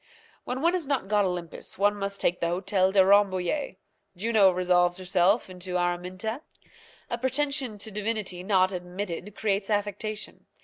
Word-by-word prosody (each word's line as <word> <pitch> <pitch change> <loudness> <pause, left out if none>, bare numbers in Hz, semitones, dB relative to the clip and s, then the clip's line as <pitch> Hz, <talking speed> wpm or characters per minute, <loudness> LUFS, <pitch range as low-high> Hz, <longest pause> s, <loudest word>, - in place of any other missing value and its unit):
When 255 +1 -3
one 340 +3 +3
has 350 -6 -1
not 270 -8 -1
got 205 0 +2
Olympus, 175 -3 -5
one 205 +2 +3
must 200 0 -4
take 175 - +1
the 170 - 0
Hôtel 185 +2 +1
de 190 -1 +5
Rambouillet. 195 - +2 0.4
Juno 215 -1 +4
resolves 180 -1 +2
herself 185 +3 +2
into 180 0 -4
Araminta. 180 +7 -2 0.7
A 235 - -1
pretension 265 -2 -1
to 215 +2 -7
divinity 210 -3 -2
not 190 0 +2
admitted 180 +2 -5
creates 200 -1 -1
affectation. 210 +1 -3
195 Hz, 145 wpm, -27 LUFS, 180-215 Hz, 0.7 s, de